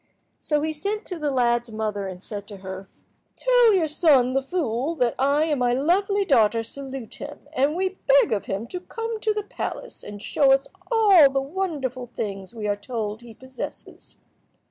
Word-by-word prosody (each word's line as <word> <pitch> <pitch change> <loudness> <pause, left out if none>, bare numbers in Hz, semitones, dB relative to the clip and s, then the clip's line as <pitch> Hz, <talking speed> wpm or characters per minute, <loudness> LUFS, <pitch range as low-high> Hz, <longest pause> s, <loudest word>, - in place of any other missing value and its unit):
So 300 -1 0
he 315 0 -1
sent 410 +7 -3
to 360 -3 -6
the 300 -1 0
lad's 240 -3 +1
mother, 210 -2 -3
and 185 0 -8
said 205 -2 -6
to 205 - -9
her— 190 0 -7 0.5
"Tell - - +5
your 350 -4 +3
son, 290 -5 +3
the 270 - +2
fool, 275 -1 -2
that 245 -6 +1
I 280 +3 +3
and 300 -4 0
my 245 -1 +2
lovely 390 +9 +2
daughter 230 - +3
salute 270 -1 -8
him, 290 0 -9
and 285 +2 +2
we 375 +1 -2
beg 275 -1 +5
of 205 - -2
him 195 +4 -3
to 360 - -4
come 455 +4 -5
to 430 0 +1
the 420 0 -2
palace - - -6
and 205 0 -8
show 270 +6 +3
us 270 0 +1 0.2
all 400 -10 +7
the 270 0 0
wonderful 275 -5 -3
things 195 -4 -5
we 220 -3 -5
are 205 - +1
told 215 0 -4
he 235 -2 -12
possesses. 260 +2 -9
270 Hz, 190 wpm, -24 LUFS, 225-335 Hz, 0.5 s, all